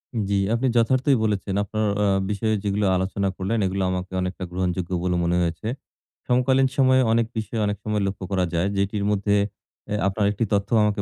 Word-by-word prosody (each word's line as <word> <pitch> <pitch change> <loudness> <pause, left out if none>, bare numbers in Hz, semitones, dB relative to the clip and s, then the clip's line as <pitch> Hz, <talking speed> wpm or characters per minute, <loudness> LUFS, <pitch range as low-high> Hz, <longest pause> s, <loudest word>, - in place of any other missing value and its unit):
উম 110 - 0
জি। 100 - +2 0.2
আপনি 120 +3 +1
যথার্থই 130 +3 +3
বলেছেন 100 -3 -1
আপনার 110 +1 -2 0.2
আ - - +3 0.2
বিষয়ে 105 +2 0
যেগুলো 100 0 0
আলোচনা 95 +2 -1
করলেন, 95 +5 -1
এগুলো 95 +1 -1
আমাকে 90 0 -4
অনেকটা 90 0 -4
গ্রহণযোগ্য 90 -1 -2
বলে 90 -1 0
মনে 85 +1 +1
হয়েছে। 85 +4 -2 0.6
সমকালীন 130 +2 +3
সময়ে 130 -1 +5
অনেক 115 0 +3
বিষয় 110 +1 -3
অনেক 105 0 -1
সময় 105 -1 -1
লক্ষ্য 95 0 -5
করা 95 -2 +1
যায়। 85 +3 +1
যেটির 100 +1 0
মধ্যে 100 0 +1 0.5
অ্যা 105 - -1
আপনার 100 +1 0
একটি 105 +3 -1
তথ্য 100 0 +1
আমাকে 105 -1 +1
100 Hz, 185 wpm, -23 LUFS, 95-110 Hz, 0.6 s, সময়ে